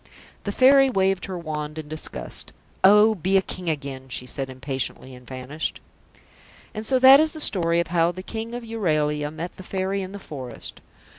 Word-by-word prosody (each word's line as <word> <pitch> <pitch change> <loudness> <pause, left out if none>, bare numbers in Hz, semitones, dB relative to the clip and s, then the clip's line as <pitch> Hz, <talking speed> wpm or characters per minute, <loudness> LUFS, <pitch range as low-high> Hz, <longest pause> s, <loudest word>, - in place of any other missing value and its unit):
The 200 - -1
Fairy 270 +4 +6
waved 195 -4 +1
her 185 -2 -5
wand 155 -2 -5
in 155 -1 -6
disgust. 155 +1 -7 0.3
"Oh, 210 +3 +7
be 190 0 +1
a - - +4
King 180 -2 -4
again," 140 -3 -4
she 125 - -4
said 135 +1 -5
impatiently, 130 0 -4
and 125 -1 -14
vanished. 130 +4 -5 0.9
And 215 -1 -5
so 265 - +3
that 265 +2 +9
is 310 0 +2
the 315 - -7
story 170 - +2
of 170 - -1
how 170 0 +2
the 185 +1 -8
King 225 +3 -5
of 245 - -6
Euralia 155 -10 0
met 165 +3 -7
the - - -9
Fairy 190 +1 -2
in 190 0 -6
the 200 - -7
forest. 130 - -8
175 Hz, 190 wpm, -24 LUFS, 150-205 Hz, 0.9 s, that